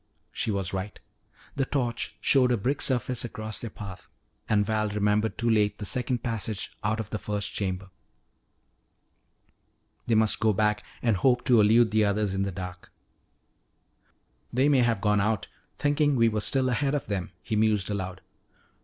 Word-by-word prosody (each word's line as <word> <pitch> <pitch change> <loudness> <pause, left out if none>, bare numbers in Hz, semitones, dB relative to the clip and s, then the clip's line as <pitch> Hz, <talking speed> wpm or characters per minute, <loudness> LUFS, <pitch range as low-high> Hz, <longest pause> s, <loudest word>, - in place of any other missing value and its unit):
She - - -2
was 100 -3 -1
right. 95 +2 -4 0.6
The 135 - 0
torch 120 -5 -2
showed 130 -3 +4
a 120 - +2
brick 130 +8 -1
surface 125 -2 +1
across 110 -2 -4
their 115 - -5
path, 95 -4 -9 0.4
and 105 -1 +3
Val 110 0 0
remembered 105 +1 0
too 120 - -1
late 105 -2 +2
the 105 - -6
second 125 +3 0
passage 110 -3 -3
out 110 +1 0
of 110 -2 -5
the 105 - -3
first 105 +1 -3
chamber. 95 -1 -3 2.2
They 115 - +3
must 110 -1 +3
go 110 -1 +3
back 105 +1 +1 0.2
and 115 -5 +2
hope 125 +4 +2
to 120 -4 +5
elude 110 +2 +4
the 110 0 +3
others 100 -1 0
in 95 - -1
the 100 0 -1
dark. 90 -1 -8 1.6
"They 130 +4 +2
may 140 -3 +4
have 120 -2 +2
all - - -15
gone 105 -1 +3
out, 105 -1 -1 0.3
thinking 145 0 +2
we 115 -2 +4
were 105 -1 -2
still 130 +3 +1
ahead 135 +3 0
of 145 - -2
them," 95 -4 -3
he 110 - -2
mused 105 -2 +2
aloud. 95 -2 -4
110 Hz, 170 wpm, -27 LUFS, 100-120 Hz, 2.2 s, to